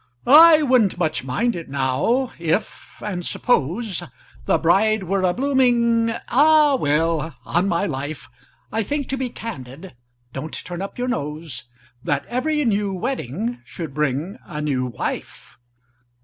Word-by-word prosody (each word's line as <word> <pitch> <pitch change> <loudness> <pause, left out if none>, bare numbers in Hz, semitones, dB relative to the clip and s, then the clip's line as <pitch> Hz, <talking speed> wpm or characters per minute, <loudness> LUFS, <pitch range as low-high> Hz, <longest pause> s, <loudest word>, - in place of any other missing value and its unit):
"I 310 +3 +8
wouldn't 250 -9 +3
much 160 -6 -1
mind 135 - 0
it, 165 -4 -7
now—if—and 175 - -1
suppose— 195 - 0 0.5
The - - +4
bride 205 +5 +3
were 190 +2 0
a 185 -1 +3
blooming—Ah! 255 - +3
well—on 160 +3 0
my 170 -3 +1
life, 140 -1 -5 0.4
I 225 - 0
think—to 280 +4 -2
be 260 -1 -3
candid—(don't 130 - -9
turn 175 0 -6
up 195 - -6
your 250 0 -2
nose!) 150 - -4 0.4
That 145 -4 -1
every 295 +4 -1
new 205 -3 +1
wedding 230 - -3
should 160 -5 -7
bring 150 - -2
a 150 - -7
new 135 -4 -1
wife!" 120 - -6
185 Hz, 120 wpm, -22 LUFS, 150-240 Hz, 0.5 s, I